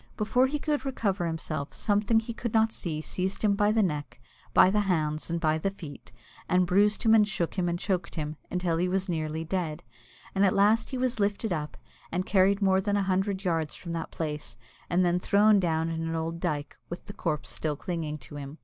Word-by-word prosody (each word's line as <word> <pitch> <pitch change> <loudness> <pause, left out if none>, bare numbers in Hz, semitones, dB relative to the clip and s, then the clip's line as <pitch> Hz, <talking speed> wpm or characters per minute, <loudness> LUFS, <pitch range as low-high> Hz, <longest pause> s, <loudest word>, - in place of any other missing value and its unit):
Before 240 +4 +3
he 295 +3 -1
could 295 -2 -1
recover 205 -10 -1
himself, 155 -3 -4
something 210 +1 +2
that 225 - +2
he 235 - -5
could 230 -1 -4
not 220 0 +4
see 155 -3 -3
seized 190 +5 -3
him 210 -2 +4
by 205 +1 +3
the 220 0 +3
neck, 145 -8 -3 0.3
by 185 - +6
the 210 - +2
hands, 155 -6 0
and 170 0 -1
by 155 -1 +1
the 195 - 0
feet, 165 -7 -10 0.4
and 180 0 +4
bruised 205 +4 +3
him, 220 - +5
and 215 -2 +6
shook 175 -6 -1
him, 180 -3 0
and 170 - -1
choked 180 -1 -2
him, 155 -1 -3
until 180 -2 0
he 180 +2 +1
was 190 +1 -1
nearly 160 -2 -2
dead; 165 -2 -3 0.5
and 195 - +2
at 190 - +4
last 210 +3 +3
he 260 - -3
was 250 -2 0
lifted 205 0 0
up, 150 -2 -4 0.3
and 180 +2 -1
carried 200 +1 +3
more 190 -1 +4
than 205 +1 0
a 200 - +1
hundred 190 +1 0
yards 165 -4 -1
from 170 - -7
that 165 -1 -3
place, 150 -2 -5 0.3
and 180 +1 +3
then 175 0 +2
thrown 205 +2 +4
down 165 -2 0
in 165 0 -3
an 165 0 -2
old 165 +1 -3
dyke, 150 -5 -2
with 175 - -7
the 205 - -8
corpse 160 -7 -3
still 155 -2 -2
clinging 155 -1 -4
to 145 +2 -11
him. 140 +2 -7
180 Hz, 220 wpm, -28 LUFS, 160-205 Hz, 0.5 s, by